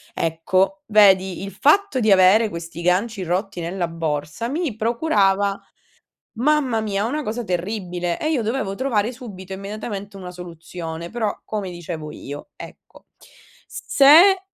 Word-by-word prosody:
Ecco, 185 - 0
vedi, 190 -3 +4
il 195 - -6
fatto 295 - +3
di 220 -2 +2
avere 195 +4 +5
questi 170 -2 -7
ganci 190 +4 0
rotti 185 +2 -2
nella 175 +1 -2
borsa 160 +6 -3
mi 300 -5 -2
procurava, 205 -5 +1 0.7
mamma 255 -2 +1
mia, 205 -1 -1
una 295 +6 -2
cosa 235 +1 -3
terribile, 180 -2 -3
e 310 - -1
io 280 -7 0
dovevo 220 -3 -2
trovare 230 -3 0
subito, 195 -7 -9
immediatamente 200 0 -6
una 185 -1 -8
soluzione, 170 -1 -8
però 225 -1 -2
come 205 -4 -4
dicevo 165 -3 -7
io, 145 - -9
ecco. - - -13 0.6
S - - -8
se 335 +8 +7
200 Hz, 135 wpm, -21 LUFS, 180-235 Hz, 0.7 s, se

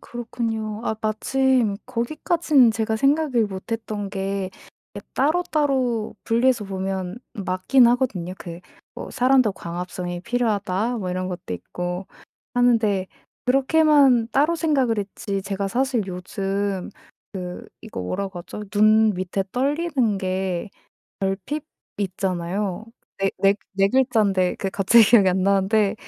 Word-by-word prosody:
그렇군요. 225 -2 -4
아 - - 0
마침 235 0 +1
거기까지는 270 +1 +2
제가 220 0 -1
생각을 275 -3 +2
못 190 +3 -7
했던 215 -3 -4
게 195 -1 -3 0.5
이 - - -5
따로따로 275 -7 0
분리해서 235 -1 +2
보면 190 +1 -4 0.2
맞긴 200 +6 +3
하거든요. 235 -8 0
그 170 -1 -8 0.3
뭐 - - -7
'사람도 255 -4 +3
광합성이 175 0 -5
필요하다.' 220 -1 0
뭐 185 -3 -4
이런 185 +1 -2
것도 175 - -5
있고 180 - -5 0.5
하는데 225 -6 +2 0.4
그렇게만 270 -2 +4
따로 300 +5 +3
생각을 270 -9 +1
했지 200 0 -4
제가 195 0 -3
사실 250 0 0
요즘 195 +1 -3 0.4
그 180 -2 -6
이거 220 - -6
뭐라고 190 - -4
하죠? 210 +4 -8
눈 215 +1 +5
밑에 185 +1 -2
떨리는 275 -5 0
게 185 0 -2 0.5
결핍 195 +11 -2 0.3
있잖아요. 190 +1 -2 0.3
그 195 - -1
4- - - +2
4- 195 0 +4 0.2
4 195 0 +3
글자인데 210 -7 +2
그게 195 - -2
갑자기 205 +4 +5
기억이 205 -3 +6
안 185 0 +1
나는데 200 +1 +2
210 Hz, 265 characters per minute, -23 LUFS, 190-245 Hz, 0.5 s, 기억이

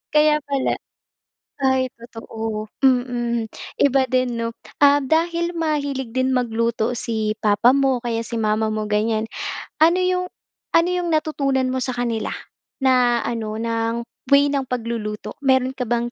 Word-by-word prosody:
Kaya 300 0 +5
pala. 275 -2 0 0.8
Ay 265 -1 +2
totoo. 225 -2 -6 0.2
Mm. 240 -2 +1 0.3
Iba 275 -1 +4
din, 255 -2 +1
'no? 230 0 -1 0.3
Ah, 285 0 +6
dahil 335 +4 +1
mahilig 285 -6 -2
din 260 0 +1
magluto 230 -1 0
si 220 -3 -2
papa 215 +4 +4
mo 270 -2 +2
o - - -13
kaya 230 -1 -1
si 230 0 -5
mama 215 0 +1
mo, 215 0 -2
ganyan. 215 +1 0 0.5
Ano 330 +3 +5
'yong 365 0 +1 0.5
ano 335 +1 +5
'yong 355 -1 -1
natutunan 275 -4 +1
mo 260 - -1
sa 255 0 -2
kanila 235 -3 -2 0.5
na 250 -2 +3
ano, 220 -2 -3
ng 230 0 -1 0.3
way 280 0 +6
ng 275 -2 -1
pagluluto? 230 -3 -4
Meron 260 -2 +2
ka 250 -3 -3
bang 240 +1 0
250 Hz, 145 wpm, -22 LUFS, 230-275 Hz, 0.8 s, Ah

